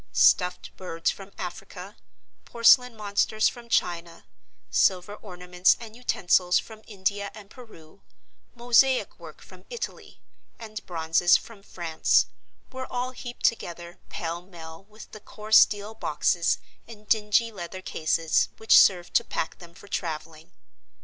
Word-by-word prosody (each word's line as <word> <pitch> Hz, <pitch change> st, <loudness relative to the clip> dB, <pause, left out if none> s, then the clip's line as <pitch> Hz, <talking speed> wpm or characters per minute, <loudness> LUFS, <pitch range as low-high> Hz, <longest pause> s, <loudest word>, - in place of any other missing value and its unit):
Stuffed 180 Hz, -1 st, +2 dB
birds 165 Hz, -3 st, -2 dB
from 195 Hz, 0 st, -12 dB
Africa, 190 Hz, +2 st, -8 dB, 0.5 s
porcelain 235 Hz, 0 st, +4 dB
monsters 210 Hz, +1 st, +1 dB
from 240 Hz, -1 st, -6 dB
China, 170 Hz, -5 st, -1 dB, 0.5 s
silver 190 Hz, +1 st, +2 dB
ornaments 180 Hz, -3 st, 0 dB
and 225 Hz, -2 st, -11 dB
utensils 180 Hz, -6 st, +2 dB
from 220 Hz, -1 st, -6 dB
India 200 Hz, 0 st, -2 dB
and 210 Hz, -2 st, -13 dB
Peru, 200 Hz, -8 st, -15 dB, 0.5 s
mosaic 245 Hz, +2 st, +2 dB
work -, -, -12 dB
from -, -, -16 dB
Italy, 475 Hz, -2 st, -7 dB, 0.4 s
and 215 Hz, -2 st, -8 dB
bronzes 165 Hz, 0 st, +3 dB
from 225 Hz, -4 st, -14 dB
France, 170 Hz, -5 st, +1 dB, 0.5 s
were 260 Hz, 0 st, -7 dB
all 250 Hz, +1 st, -2 dB
heaped 245 Hz, -1 st, -7 dB
together 175 Hz, -5 st, -2 dB
pell 170 Hz, 0 st, -5 dB
mell 170 Hz, -1 st, -12 dB
with 215 Hz, +1 st, -14 dB
the 215 Hz, -, -10 dB
coarse 215 Hz, +1 st, +4 dB
deal 205 Hz, +1 st, -7 dB
boxes -, -, 0 dB, 0.3 s
and 215 Hz, -2 st, -14 dB
dingy 220 Hz, +1 st, +2 dB
leather 185 Hz, -1 st, -8 dB
cases 160 Hz, -1 st, 0 dB
which 220 Hz, -, +4 dB
served 175 Hz, -2 st, +3 dB
to -, -, +3 dB
pack 160 Hz, -, -4 dB
them 170 Hz, -1 st, -14 dB
for 200 Hz, -, -15 dB
traveling. 160 Hz, -3 st, -5 dB
200 Hz, 130 wpm, -26 LUFS, 175-220 Hz, 0.5 s, porcelain